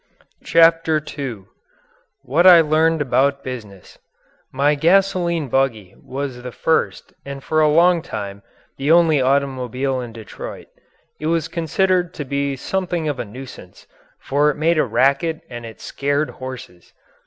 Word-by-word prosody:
CHAPTER 165 -1 +4 0.2
II 125 -9 -5 0.8
WHAT 155 +8 +3
I 175 -2 +10
LEARNED 160 0 +2
ABOUT 140 +1 +1
BUSINESS 105 -7 -9 0.5
My 140 +3 +2
"gasoline 170 0 +2
buggy" 115 -7 -1
was 130 -2 -5
the 125 0 -7
first 160 +6 -1
and 140 0 -8
for 155 0 +1
a 155 - +5
long 170 +2 +4
time 100 - -6 0.4
the 140 +3 0
only 165 -4 +5
automobile 130 -1 0
in 120 -2 -7
Detroit. 110 -2 -9 0.5
It 155 - -3
was 165 -1 0
considered 180 +2 0
to 150 - -5
be 140 +1 -2
something 175 +2 -2
of 145 -4 -2
a - - -3
nuisance, 110 -5 -12 0.3
for 145 +2 +1
it 150 - -2
made 160 +2 +2
a - - +3
racket 140 +7 +1
and 120 -1 -7
it 110 - -12
scared 145 +2 -2
horses. 130 -8 -10
140 Hz, 140 wpm, -20 LUFS, 130-165 Hz, 0.8 s, I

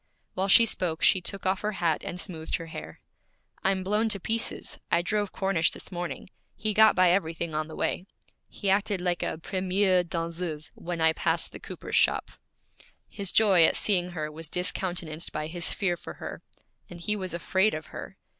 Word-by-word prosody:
While 190 +1 0
she 230 +4 +8
spoke 175 -7 -2
she 190 - +5
took 195 +3 -4
off 190 0 +1
her 215 0 -1
hat 170 -4 0
and 180 - -5
smoothed 160 -4 -3
her 165 - -5
hair. 80 - -9 0.6
'I'm 190 -1 +1
blown 210 +4 +1
to 205 -2 +2
pieces. 225 +4 -2
I 170 0 +3
drove 205 +2 -1
Cornish 190 -5 +1
this - - -10
morning; 175 +1 -5 0.2
he 215 +1 -2
got 220 +1 +6
by 185 -1 +5
everything 170 -3 -1
on 155 0 -1
the 160 - -9
way. 185 - -1 0.4
He 195 - -1
acted 200 0 +1
like 175 -1 -1
a - - -2
première 185 +1 +1
danseuse 165 -2 -4
when 170 -1 -5
I 160 0 +5
passed - - 0
the - - -9
cooper's - - -3
shop.' - - +2 0.8
His 200 -3 -4
joy 195 -6 +6
at - - +5
seeing 180 -4 +2
her 155 -2 -3
was 160 0 -5
discountenanced 175 -3 -1
by 155 0 -3
his 170 +2 0
fear 180 -3 0
for - - -9
her; - - -7 0.5
and 175 - -9
he 210 +5 -1
was 185 -4 -4
afraid 190 +4 +2
of 155 - -6
her. - - -8
180 Hz, 190 wpm, -28 LUFS, 165-195 Hz, 0.8 s, she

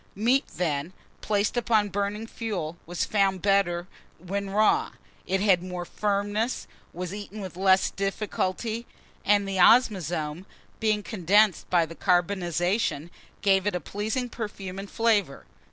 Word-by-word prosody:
MEAT, 245 +7 +2
THEN, 160 -1 -2 0.3
PLACED 215 +3 0
ON 215 -3 +3
BURNING 205 +2 -2
FUEL 200 -9 -4
was 175 0 -1
found 195 -3 +1
better 195 -3 +2 0.3
than 180 - -16
when 200 0 -2
raw: 215 - +2 0.3
it 190 +1 0
had 195 -4 +4
more 180 -1 -5
firmness, 205 +5 -1 0.3
was 180 +1 -5
eaten 205 +1 -7
with 190 -3 -7
less 190 0 +3
difficulty, 210 +3 -2 0.4
and 205 -1 +3
the 195 -1 -2
ozmazome 180 -6 +3 0.3
being 215 -2 +1
condensed 205 0 +2
by 175 -2 +3
the 165 - -10
carbonization, 175 -2 0 0.3
gave 195 -1 +3
it 205 - 0
a - - 0
pleasing 215 - -3
perfume 200 -5 -6
and 200 0 -7
flavour. 210 -11 +1
195 Hz, 135 wpm, -26 LUFS, 180-210 Hz, 0.4 s, had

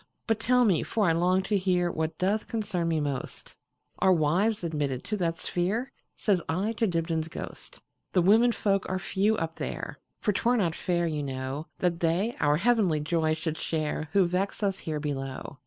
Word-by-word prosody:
"But 225 -1 +1
tell 250 +2 +4
me, 185 -8 +3
for 215 -2 0
I - - +4
long 180 +3 +2
to 205 +1 +1
hearWhat 175 -4 0
doth 200 +4 0
concern 205 -7 -2
me 165 -1 +1
most, 140 -3 -4 0.4
Are 190 - +4
wives 180 +6 +2
admitted 145 -6 -2
to 210 - -2
that 165 -3 -1
sphere?"Says 195 +1 -1
I 190 +7 0
to 225 - +2
Dibdin's 165 -2 -1
ghost."The 175 +2 -5
women 225 +6 +5
folk 195 -4 0
are 185 - 0
few 205 +3 +1
up 165 0 -2
there; - - -5 0.2
For 210 - +1
't 190 - -1
were 245 +1 +3
not 175 -7 +1
fair, 175 0 0
you 155 -3 -1
know, 135 +2 -4
That 175 -2 0
they 175 +8 +1
our 150 0 +3
heavenly 200 -5 +3
joy 155 0 +1
should 160 0 -3
shareWho 160 +4 0
vex 185 +5 -1
us 195 -1 0
here 155 -2 -3
below. 135 -2 -5
175 Hz, 175 wpm, -28 LUFS, 155-200 Hz, 0.4 s, women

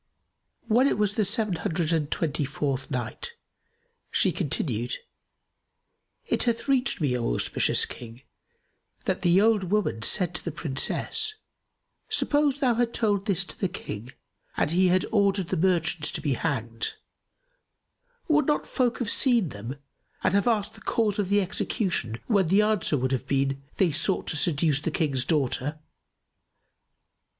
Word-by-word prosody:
When 245 +4 +4
it - - +1
was 210 -1 +1
the 215 - +1
Seven 205 -2 +1
Hundred 165 0 -1
and 150 -3 0
Twenty 155 -3 -1
fourth 140 -1 -3
Night, 130 - -4 0.8
She - - +2
continued, - - -2 1.3
It - - 0
hath 235 +1 0
reached 270 -1 +1
me, 140 -6 +1
O 115 - -1
auspicious - - +2
King, 120 +2 -10 0.8
that - - -1
the 175 +2 +4
old 215 -2 +3
woman 190 - 0
said 180 - +1
to - - -4
the 170 - -3
Princess, 155 - -1 0.7
"Suppose 290 -2 +2
thou 250 -3 +3
had 235 0 0
told 205 -3 0
this 190 -2 +2
to - - -9
the 190 - +1
King 120 - -7 0.5
and 150 - +1
he 185 +2 +3
had 185 +1 +2
ordered 200 -4 +2
the - - 0
merchants 165 -3 +2
to 170 - -3
be 145 -3 0
hanged, 120 -5 -2 1.3
would 300 -1 +3
not 300 - +1
folk 245 -3 0
have 235 -3 -1
seen 235 - +3
them 115 +5 -7 0.5
and - - +2
have 200 +3 +2
asked 215 -3 +1
the - - -16
cause 215 -3 0
of 195 -3 0
the 205 0 +4
execution 185 - -2
when 200 -6 +2
the 195 +5 +4
answer 210 -8 +1
would 130 0 -1
have 130 0 -2
been, 135 0 0
'They 180 -4 +2
sought 175 +6 0
to - - 0
seduce 150 -2 +2
the 155 - -1
King's 140 -6 0
daughter? 145 -1 0
180 Hz, 155 wpm, -26 LUFS, 145-210 Hz, 1.3 s, When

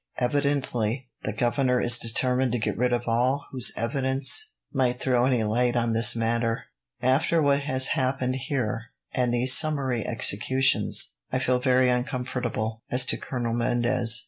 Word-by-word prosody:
Evidently, 130 -2 -1
the 110 - -3
governor 125 +3 0
is 120 0 +4
determined 125 +2 0
to - - +1
get 110 - -2
rid 125 +1 0
of 120 0 -2
all 125 +5 0
whose 130 -3 +2
evidence 135 - 0 0.2
might 125 -3 0
throw 125 -2 +1
any 125 -4 +1
light 120 +3 0
on 120 -1 0
this 115 +1 +4
matter. 115 0 -1 0.4
After 135 +6 +2
what 140 -2 +2
has 130 -2 +1
happened 130 0 -1
here, 125 -4 -3 0.3
and 125 -2 0
these 125 +2 +4
summary 140 -7 +2
executions, 130 +4 +1 0.2
I 130 - 0
feel 125 -1 0
very 130 0 +2
uncomfortable 125 -3 -3
as 125 +1 +3
to - - 0
Colonel 120 -3 -4
Mendez. 120 0 +1
125 Hz, 150 wpm, -25 LUFS, 120-130 Hz, 0.4 s, is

